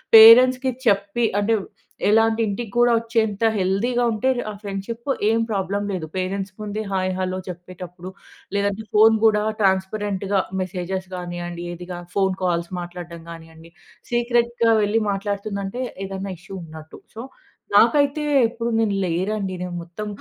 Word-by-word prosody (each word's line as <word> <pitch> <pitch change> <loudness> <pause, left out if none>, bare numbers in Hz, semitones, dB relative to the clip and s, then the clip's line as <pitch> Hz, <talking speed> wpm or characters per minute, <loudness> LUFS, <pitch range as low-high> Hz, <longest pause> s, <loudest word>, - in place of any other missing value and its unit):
పేరెంట్స్‌కి 250 +4 +8
చెప్పి 200 +2 +2
అంటే 225 +2 +2 0.5
ఎలా 225 +1 +5
అంటే 225 +1 -1
ఇంటికి 205 +1 -4
కూడా 240 0 +5
వచ్చేంత 225 -2 -1 0.2
హెల్తీగా 225 +7 +1
ఉంటే, 250 +5 0 0.2
ఆ - - -7
ఫ్రెండ్షిప్ 215 +6 -5 0.2
ఏం 225 +1 +2
ప్రాబ్లమ్ 200 0 -1
లేదు. 180 -4 -3
పేరెంట్స్ 190 +1 -3
ముందే 210 +1 -4
హాయ్, 185 0 0
హలో 185 0 -2
చెప్పేటప్పుడు 180 +1 -9 0.4
లేదంటే 200 +1 0
ఫోన్ 220 +1 +7
గూడా 210 -1 +4 0.2
ట్రాన్స్పరెంట్‌గా 195 0 0 0.2
మెసేజెస్ 185 +1 -4
గానియ్యండి 175 -1 -5
ఏదిగా 175 0 -7 0.2
ఫోన్ 190 -2 +2
కాల్స్ 170 -1 0
మాట్లాడడం 175 -1 -8
గానియ్యండి. 165 0 -13 0.4
సీక్రెట్‌గా 235 -1 +2
వెళ్లి 210 +2 +1
మాట్లాడుతుందంటే 200 +2 -3 0.2
ఏదైనా 195 0 -5
ఇష్యూ 190 +2 -10
ఉన్నట్టు. 160 0 -12 0.2
సో 225 - -6 0.5
నాకైతే 285 +7 +4 0.2
ఎప్పుడు 230 +1 -4
నేను 210 -3 +1
లేరండి 190 +3 -1
నేను 180 -1 -4
మొత్తం 175 +5 -7
200 Hz, 130 wpm, -22 LUFS, 185-225 Hz, 0.5 s, పేరెంట్స్‌కి